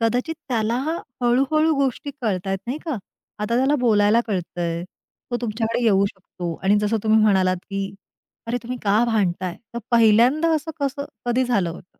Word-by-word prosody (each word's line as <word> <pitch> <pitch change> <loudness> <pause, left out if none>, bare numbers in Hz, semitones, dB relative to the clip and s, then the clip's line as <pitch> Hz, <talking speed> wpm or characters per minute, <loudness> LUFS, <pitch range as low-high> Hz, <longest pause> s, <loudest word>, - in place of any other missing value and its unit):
कदाचित 245 +8 0
त्याला 230 -2 0 0.5
हळूहळू 275 +6 +3
गोष्टी 275 +1 -1
कळतायेत 195 -4 -1
नाही 260 +6 -3
का? 315 -6 -2 0.4
आता 210 +3 -1
त्याला 270 +3 +3
बोलायला 215 -1 +4
कळतंय. 175 -4 -2 0.5
तो 240 - 0
तुमच्याकडे 230 +1 -1
येऊ 200 -3 +4
शकतो 185 -3 -6
आणि 200 +2 +4
जसं 210 +2 +1
तुम्ही 220 0 +4
म्हणालात 190 -3 +3
की 195 0 -3 0.5
"अरे, 235 +2 -1
तुम्ही 250 +1 -5
का 210 +3 +3
भांडताय?" 185 -6 0 0.2
तर 235 - -2
पहिल्यांदा 235 +7 +5
असं 315 +1 -2
कसं 280 0 -2 0.2
कधी 245 +2 +2
झालं 205 -9 +1
होतं? 175 +2 -13
225 Hz, 155 wpm, -22 LUFS, 195-250 Hz, 0.5 s, पहिल्यांदा